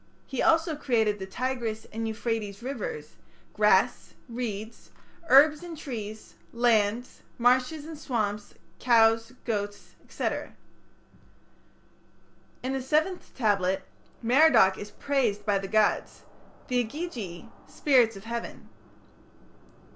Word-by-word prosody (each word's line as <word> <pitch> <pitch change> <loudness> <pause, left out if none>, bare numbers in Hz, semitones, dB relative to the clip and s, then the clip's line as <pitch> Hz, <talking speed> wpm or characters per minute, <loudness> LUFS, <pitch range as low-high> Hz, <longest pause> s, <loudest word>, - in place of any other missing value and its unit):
He 265 - -3
also 325 -1 +3
created 220 -7 +1
the 190 - -6
Tigris 235 0 -3
and 225 +1 -3
Euphrates 220 -1 -3
rivers, 455 - -5 0.4
grass, - - +2
reeds, 230 -2 -6 0.4
herbs 295 +3 +6
and 345 -2 -8
trees, 220 -7 -7 0.2
lands, 235 0 +1 0.2
marshes 255 +5 +2
and 320 0 -7
swamps, 210 -7 -3 0.2
cows, 225 -1 +3
goats, 205 -3 -4 0.2
&c. - - -2 2.4
In 260 +1 -2
the 270 - -2
seventh 315 +7 -1
tablet 195 -5 +1 0.4
Merodach 245 -6 +5
is 205 - -8
praised 235 -8 -1
by 205 -2 +2
the 195 - -5
gods 215 +1 +1 0.4
the 250 -1 +1
Igigi 230 - -6 0.2
(spirits 245 -6 +3
of 195 - -10
heaven). 235 +1 -6
235 Hz, 105 wpm, -27 LUFS, 210-270 Hz, 2.4 s, herbs